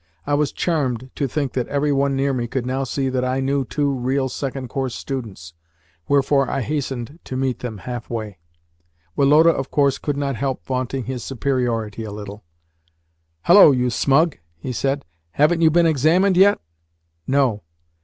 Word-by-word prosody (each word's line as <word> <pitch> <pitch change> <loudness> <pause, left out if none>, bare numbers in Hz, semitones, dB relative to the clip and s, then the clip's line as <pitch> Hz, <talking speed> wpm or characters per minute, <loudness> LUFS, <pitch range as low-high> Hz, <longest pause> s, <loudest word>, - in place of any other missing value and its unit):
I 145 - -1
was 145 -1 +1
charmed 130 -7 -2
to 140 - -1
think 140 0 -2
that 125 -2 -2
every 145 +1 0
one 140 0 +1
near 135 +1 0
me 120 -2 -2
could 125 +1 -3
now 130 +2 -1
see 135 +1 -2
that 130 -1 -1
I 130 +1 0
knew 135 +1 0
two 140 +2 -1
real 130 +1 -1
second 135 -1 -4
course 130 -2 -3
students: 105 -11 -6 0.5
wherefore 140 -1 +2
I 135 - -1
hastened 140 +1 -4
to 130 - -5
meet 130 -1 -1
them 115 -4 -5
half 120 +5 -7
way. 110 -6 -5 0.8
Woloda, 150 +4 +5
of 135 -4 -4
course, 140 -2 +2
could 145 -2 -3
not 140 -2 -1
help 135 0 -3
vaunting 130 0 -2
his 125 0 -5
superiority 120 -5 -2
a 110 - -6
little. 105 0 -8 1.0
"Hullo, 190 -1 +8
you 125 -2 +1
smug!" 145 +6 +2 0.2
he 125 - -5
said. 140 +3 -1 0.3
"Haven't 165 +3 +3
you 160 - +6
been 170 +2 +3
examined 165 +6 +3
yet?" 200 +3 +5 0.7
"No." 130 -6 +1
135 Hz, 170 wpm, -21 LUFS, 125-145 Hz, 1.0 s, Hullo